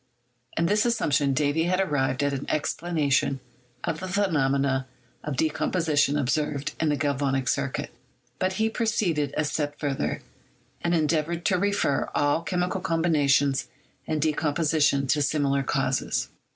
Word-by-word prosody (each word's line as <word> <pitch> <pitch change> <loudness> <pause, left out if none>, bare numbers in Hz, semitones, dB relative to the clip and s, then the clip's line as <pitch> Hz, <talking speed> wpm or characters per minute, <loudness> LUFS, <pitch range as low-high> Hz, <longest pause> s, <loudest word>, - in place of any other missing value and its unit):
In 170 - +2
this 210 +4 +3
assumption 145 - +1
Davy 150 +3 +1
had 185 +1 +1
arrived 145 -6 0
at 145 0 +1
an 135 0 -4
explanation 145 -3 0 0.4
of 165 -2 -2
the 185 - -5
phenomena 140 -9 +1 0.4
of 150 -3 -4
decomposition 155 -1 +1
observed 145 +1 -1
in 160 - +1
the 145 - +2
galvanic 140 -2 0
circuit. - - -1 0.5
But 185 0 0
he 220 +3 +1
proceeded 200 - 0
a 155 - +1
step 145 0 -2
further, 140 -2 -2 0.6
and 170 0 +1
endeavored 160 +2 0
to 185 -2 +2
refer 200 -8 +1
all 145 +2 +2
chemical 180 +2 -1
combination 155 -6 +2 0.5
and 155 - -1
decomposition 150 -2 +1
to 145 +3 +1
similar 140 -1 +1
causes. 135 - -1
150 Hz, 135 wpm, -26 LUFS, 140-170 Hz, 0.6 s, this